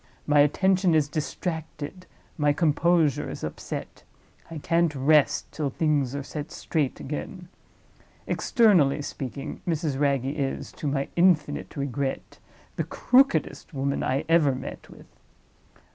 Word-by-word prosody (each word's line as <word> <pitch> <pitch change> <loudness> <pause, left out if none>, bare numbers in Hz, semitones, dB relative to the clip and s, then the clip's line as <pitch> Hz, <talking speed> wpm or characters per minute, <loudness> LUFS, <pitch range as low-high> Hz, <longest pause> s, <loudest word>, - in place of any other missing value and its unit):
My 145 0 +3
attention 185 +4 +3
is 150 -2 +3
distracted, 160 +2 -5 0.3
my 150 -3 +2
composure 165 -1 +2
is - - -7
upset; - - -6 0.5
I 165 - -7
can't 165 +1 +1
rest 145 +2 +3
till 150 -2 -2
things 140 -2 0
are 140 - -3
set 150 +3 -6
straight 155 -5 -2
again. 175 +5 -6 0.8
Externally 180 - +3
speaking, 135 -1 -6
Mrs. 155 -5 -1
Wragge 140 -3 +1
is, 135 -1 -3
to 150 - -6
my 140 -1 -1
infinite 170 -5 +2
regret, 140 -1 -3 0.4
the - - 0
crookedest 165 - +1
woman 140 +1 -1
I 135 +4 -1
ever 160 -5 +4
met - - -8
with. - - -14
150 Hz, 125 wpm, -26 LUFS, 140-170 Hz, 0.8 s, ever